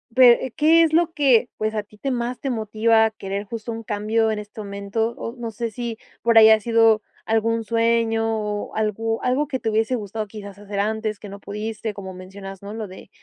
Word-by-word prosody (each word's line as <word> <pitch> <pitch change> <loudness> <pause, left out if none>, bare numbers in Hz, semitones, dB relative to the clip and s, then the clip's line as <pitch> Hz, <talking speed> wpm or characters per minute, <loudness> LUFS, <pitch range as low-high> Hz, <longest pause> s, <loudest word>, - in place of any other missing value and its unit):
pe, 250 -1 +6
¿qué 325 +2 +5
es 315 -1 +1
lo 335 0 +3
que 260 -6 +4
pues 215 0 -1
a 210 - -1
ti 210 +1 -20
te 270 +5 -2
más 240 0 -2
te 275 - -3
motiva, 220 0 +2
a 220 - 0
querer 200 -1 -5
justo, 230 +2 -6
un 225 0 -6
cambio 220 +2 0
en 210 - -2
este 210 +1 -9
momento? 200 +3 -2
O 230 - -6
no 235 -2 -5
sé, 230 +2 -3
si 235 0 -5 0.2
por 230 -1 +3
ahí 220 0 +9
ha 220 0 +6
sido 225 -1 +4 0.2
algún 225 0 +1
sueño, 230 0 +2
o 210 -1 -4
algo 225 +1 -1
algo 275 +4 0
que 260 -2 -2
te 225 - -1
hubiese 220 +3 +1
gustado, 215 0 -4
quizás, 200 -2 -9
hacer 205 -1 -5
antes, 215 0 -1
que 210 - -9
no 200 +1 -10
pudiste, 215 +1 -4
como 190 -2 -8
mencionas 195 +1 -10
¿no? 200 +1 -7
Lo 220 -2 -5
de, 190 +1 -12
220 Hz, 220 wpm, -23 LUFS, 210-230 Hz, 0.2 s, ahí